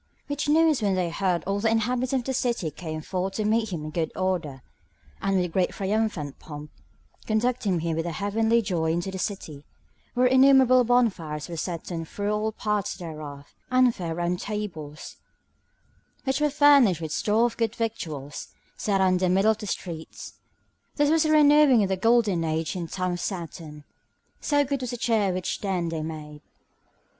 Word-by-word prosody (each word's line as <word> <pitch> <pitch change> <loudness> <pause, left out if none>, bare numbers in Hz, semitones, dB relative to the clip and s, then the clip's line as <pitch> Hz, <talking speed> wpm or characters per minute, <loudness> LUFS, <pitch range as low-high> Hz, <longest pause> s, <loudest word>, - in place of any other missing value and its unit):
Which 290 +1 -3
news 315 -3 +4
when 200 -2 +1
they 180 -2 -1
heard 180 -2 0
all 200 +1 -1
the 225 +2 +2
inhabitants 245 +3 0
of 265 -2 0
the 265 - -2
city 235 -10 -1
came 155 0 -6
forth 185 +3 -3
to 215 - -1
meet 220 0 +1
him 160 -4 -4
in 155 - -6
good 160 -1 -2
order, 170 -8 -2 0.6
and 195 - 0
with 180 -1 +2
a - - -2
great 180 +2 +1
triumphant 195 -8 -2
pomp, 150 -1 -9 0.6
conducting 215 -5 0
him 165 -1 -1
with 165 +1 -2
a - - -2
heavenly 220 +6 +1
joy 165 -5 0
into 175 +3 -2
the 190 - -6
city, 160 -8 -5 0.5
where 250 +1 +3
innumerable 260 -1 +6
bonfires 190 -11 0
were 170 - -6
set 170 +2 -4
on 165 -1 -4
through 205 +5 -3
all 210 +1 0
the - - -1
parts 210 -2 -1
thereof, 150 -4 -9 0.2
and 255 -1 +4
fair 170 -5 -4
round 175 +1 -1
tables, 165 -9 -6 1.1
which 265 +2 -1
were 300 - +3
furnished 280 - +5
with 160 -2 -5
store 215 +8 +2
of 240 - -2
good 230 -1 -1
victuals, 155 -11 -4 0.3
set 195 -2 0
out 190 - +4
in 185 - +2
the 185 0 +1
middle 195 +4 +4
of 220 - -3
the 210 - -6
streets. 165 -4 -6 0.6
This 290 0 +2
was 320 0 +3
a 310 - +2
renewing 295 -5 +6
of 195 - -1
the 190 - +1
golden 210 -3 +2
age 160 +1 -2
in 175 -2 -3
the - - -19
time 185 -1 -1
of 175 - -3
Saturn, 165 -5 -6 0.6
so 290 -1 +2
good 275 -1 -2
was 250 - -3
the 245 - -4
cheer 220 -4 +1
which 185 0 -3
then 185 -4 -1
they 165 -1 -3
made. 150 -1 -7
195 Hz, 190 wpm, -26 LUFS, 165-235 Hz, 1.1 s, innumerable